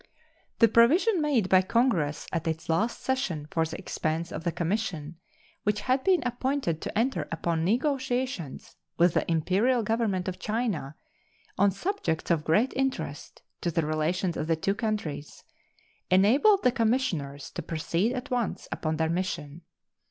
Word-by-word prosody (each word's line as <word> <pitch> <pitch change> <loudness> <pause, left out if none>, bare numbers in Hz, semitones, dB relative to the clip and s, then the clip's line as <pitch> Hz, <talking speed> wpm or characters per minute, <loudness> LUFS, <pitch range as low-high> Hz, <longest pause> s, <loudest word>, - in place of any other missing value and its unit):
The 230 - +6
provision 315 - +4
made 275 -10 +2
by 185 0 +5
Congress 185 - +1
at 165 0 -2
its 160 0 -3
last 210 +9 0
session 185 - -1
for 165 -1 +1
the 160 - -6
expense 165 -2 -3
of - - -5
the 170 - 0
commission 170 -3 -2 0.4
which 210 0 0
had 255 +4 +1
been 370 -7 +3
appointed 250 - -1
to - - -4
enter 250 +4 0
upon 165 0 -1
negotiations 250 - -1 0.2
with 175 0 +4
the - - 0
Imperial 200 +10 +2
Government 215 -4 0
of 185 0 -4
China 210 - -2 0.6
on 200 +1 +5
subjects 195 - -2
of 160 -3 +2
great 210 +12 +2
interest 270 0 -3 0.2
to 175 - 0
the 165 -1 0
relations 160 +3 0
of 155 - -3
the 165 - +2
two 195 +5 0
countries 205 -9 -4 0.7
enabled 255 - +5
the 250 - +5
commissioners 220 - -1
to - - -5
proceed 170 +7 -1
at 255 +2 -5
once 245 -4 -2
upon 155 -1 -2
their 160 0 +1
mission. 170 -3 -3
190 Hz, 150 wpm, -27 LUFS, 165-245 Hz, 0.7 s, The